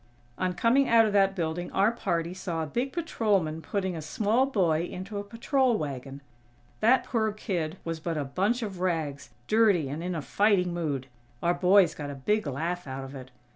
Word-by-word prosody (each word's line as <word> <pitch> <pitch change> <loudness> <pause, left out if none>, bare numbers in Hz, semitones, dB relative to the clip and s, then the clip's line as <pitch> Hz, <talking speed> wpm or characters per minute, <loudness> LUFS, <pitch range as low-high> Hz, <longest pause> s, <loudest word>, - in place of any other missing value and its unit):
On 185 -1 0
coming 250 +6 +3
out 230 -1 +6
of 210 - -1
that 195 -1 +3
building 170 0 -3
our 200 +3 +3
party 170 -7 -2
saw 175 -3 -3
a - - -2
big 240 - -2
patrolman 205 - 0
putting 190 0 -2
a 160 - -5
small 220 - +1
boy 175 - +2
into 195 +4 -6
a - - -4
patrol 235 +3 +1
wagon. 140 -2 -5 0.6
That 245 +4 +4
poor 220 -3 0
kid 185 -6 -3
was 165 -1 -4
but 165 0 -3
a 145 - -1
bunch 200 - 0
of 195 -4 -5
rags, 155 -8 -2 0.2
dirty, 205 -10 +3
and 150 +4 -4
in 180 0 -2
a 160 - -2
fighting 195 -3 +2
mood. 150 -6 -2 0.4
Our 175 - +3
boys 185 0 +4
got 145 -1 -6
a 140 - -5
big 210 +8 0
laugh 165 +5 -3
out 135 0 -5
of 135 +1 -9
it. 130 -2 -9
180 Hz, 195 wpm, -28 LUFS, 155-215 Hz, 0.6 s, out